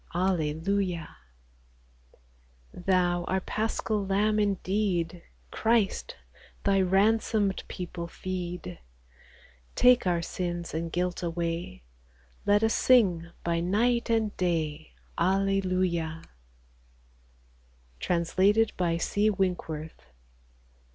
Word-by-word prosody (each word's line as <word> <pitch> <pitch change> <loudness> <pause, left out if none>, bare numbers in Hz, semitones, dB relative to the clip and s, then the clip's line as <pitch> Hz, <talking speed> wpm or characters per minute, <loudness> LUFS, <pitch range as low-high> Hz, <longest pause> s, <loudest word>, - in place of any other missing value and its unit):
Alleluia! 180 +1 -1 1.6
Thou, 180 -1 +1
our 190 - 0
Paschal 215 +1 -2
Lamb 205 +2 +1
indeed, 190 -4 0 0.3
Christ, 225 -3 +1 0.5
Thy 195 -1 +3
ransomed 200 +1 +2
people 175 -1 -6
feed! 180 - -5 1.0
Take 250 -4 +5
our 170 -1 +1
sins 175 -1 -4
and 165 +1 -3
guilt 180 +1 -1
away, 170 - -3 0.6
Let 205 +1 +4
us 225 - +3
sing 185 -10 +3
by 170 0 0
night 230 +8 +1
and 225 -2 +1
day, 160 -4 -2
— - - -32
Alleluia! 185 -3 0 1.8
Translated 190 +5 +2
by 170 -2 +1
C. 205 +5 +1
Winkworth. 175 -6 -3
185 Hz, 85 wpm, -28 LUFS, 170-205 Hz, 1.8 s, Take